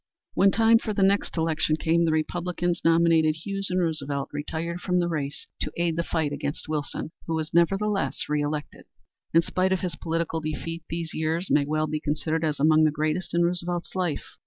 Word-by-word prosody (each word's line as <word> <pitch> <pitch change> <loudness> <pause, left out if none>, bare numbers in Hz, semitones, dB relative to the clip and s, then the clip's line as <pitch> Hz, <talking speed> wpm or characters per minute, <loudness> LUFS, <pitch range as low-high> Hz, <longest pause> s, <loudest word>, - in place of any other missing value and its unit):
When 195 - +5
time 225 +2 +5
for 215 -3 -3
the 195 - +2
next 195 -1 +2
election 160 -1 +1
came, 165 +2 +2
the 160 - +2
Republicans 175 +2 -1
nominated 165 -2 +4
Hughes 195 +4 -3
and 185 0 +1
Roosevelt 145 -5 -2
retired 165 +4 -4
from 180 -1 0
the 175 -1 +2
race 150 -4 -3
to - - -2
aid 170 -1 +1
the 170 - +1
fight 160 -4 -1
against 145 +2 -4
Wilson, 155 0 -3 0.2
who 165 - 0
was 160 -1 -3
nevertheless 195 +4 +2
reelected. 150 0 -2 0.5
In 165 +1 +5
spite 185 +3 0
of 190 - +1
his 180 -3 -3
political 165 0 -2
defeat 160 +2 -4
these 165 -1 -4
years 160 +3 -1
may 145 -1 +4
well 155 +1 0
be 155 0 -2
considered 155 +2 -1
as 155 -2 0
among 155 +2 +5
the 155 - +5
greatest 155 +4 -2
in 170 - +4
Roosevelt's 175 0 -2
life. 180 -6 -1
165 Hz, 190 wpm, -26 LUFS, 155-175 Hz, 0.5 s, When